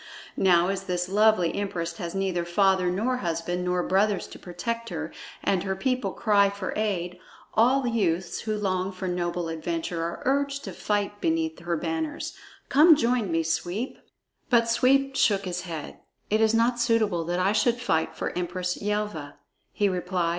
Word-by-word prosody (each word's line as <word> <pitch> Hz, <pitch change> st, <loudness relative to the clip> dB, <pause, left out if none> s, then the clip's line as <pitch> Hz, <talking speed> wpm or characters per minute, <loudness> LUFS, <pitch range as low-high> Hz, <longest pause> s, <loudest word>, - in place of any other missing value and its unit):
Now 180 Hz, -1 st, +4 dB
as 195 Hz, 0 st, -3 dB
this 180 Hz, -1 st, -1 dB
lovely 205 Hz, -3 st, +3 dB
empress 170 Hz, -4 st, -3 dB
has 170 Hz, +1 st, -5 dB
neither 190 Hz, -3 st, 0 dB
father 190 Hz, +1 st, +2 dB
nor 225 Hz, +8 st, 0 dB
husband 175 Hz, -2 st, -2 dB
nor 180 Hz, 0 st, 0 dB
brothers 195 Hz, +1 st, +1 dB
to -, -, -11 dB
protect 230 Hz, +6 st, -4 dB
her, 160 Hz, -2 st, -4 dB, 0.3 s
and 190 Hz, -2 st, +2 dB
her 190 Hz, 0 st, -2 dB
people 255 Hz, 0 st, 0 dB
cry 200 Hz, -2 st, +3 dB
for 200 Hz, -1 st, -5 dB
aid, 180 Hz, -4 st, -2 dB, 0.3 s
all 255 Hz, +4 st, +4 dB
youths 185 Hz, -7 st, 0 dB
who 215 Hz, -1 st, -2 dB
long 190 Hz, -2 st, -1 dB
for 185 Hz, 0 st, -5 dB
noble 175 Hz, -1 st, -2 dB
adventure 165 Hz, +1 st, -3 dB
are 170 Hz, +1 st, -4 dB
urged 280 Hz, +1 st, 0 dB
to 190 Hz, -, -6 dB
fight 205 Hz, +1 st, -2 dB
beneath 325 Hz, -1 st, 0 dB
her 170 Hz, -1 st, -2 dB
banners. 160 Hz, -1 st, -3 dB, 0.3 s
Come 310 Hz, +4 st, +7 dB
join 240 Hz, -, +1 dB
me, 165 Hz, 0 st, +1 dB
Sweep." 175 Hz, +9 st, -2 dB, 0.5 s
But 235 Hz, -2 st, +4 dB
Sweep 270 Hz, +3 st, +3 dB
shook 200 Hz, -6 st, +2 dB
his 180 Hz, -1 st, -3 dB
head. 160 Hz, -3 st, -6 dB, 0.3 s
"It 215 Hz, +1 st, +3 dB
is 220 Hz, 0 st, +4 dB
not 240 Hz, +1 st, +2 dB
suitable 215 Hz, -7 st, +2 dB
that 175 Hz, +1 st, -1 dB
I 190 Hz, +2 st, +3 dB
should 235 Hz, +3 st, +2 dB
fight 160 Hz, -10 st, 0 dB
for -, -, -4 dB
Empress 180 Hz, 0 st, -2 dB
Yelva," 205 Hz, -8 st, -2 dB, 0.4 s
he 205 Hz, -, +1 dB
replied. 180 Hz, -2 st, -1 dB
190 Hz, 170 wpm, -26 LUFS, 175-220 Hz, 0.5 s, Come